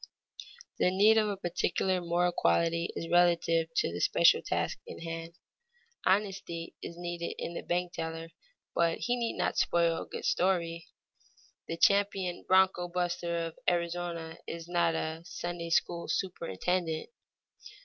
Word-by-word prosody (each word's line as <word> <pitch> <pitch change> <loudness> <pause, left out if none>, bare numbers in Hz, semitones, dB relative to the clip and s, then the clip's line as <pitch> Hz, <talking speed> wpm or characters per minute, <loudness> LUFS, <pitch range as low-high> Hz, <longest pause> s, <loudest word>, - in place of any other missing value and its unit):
_ - - -6 0.4
The - - +4
need 210 +4 +5
of 215 -1 +1
a 200 - -3
particular 180 +1 0
moral 175 +1 +1
quality 170 - +1
is 165 - -4
relative 170 -2 +4
to 85 - +1
the 85 - -4
special - - +5
task - - -2
in - - -8
hand. 165 0 -6 0.7
Honesty 190 -4 0
is 170 - -7
needed 175 -1 -4
in 170 - -4
the - - -4
bank 175 0 -1
teller, 165 0 -5 0.4
but 170 -1 +2
he 245 - 0
need 235 -2 -2
not - - 0
spoil 170 -1 +2
a - - -8
good - - -6
story. 170 -3 +1 0.8
The 165 - -4
champion 195 -1 +2
broncho 185 -1 +4
buster 175 -1 -1
of 165 - -8
Arizona 170 -1 -3
is 165 0 -6
not 170 -2 +2
a 160 0 -3
Sunday 175 -1 -5
school 170 +1 +1
superintendent. 175 - -2
175 Hz, 145 wpm, -30 LUFS, 165-180 Hz, 0.8 s, need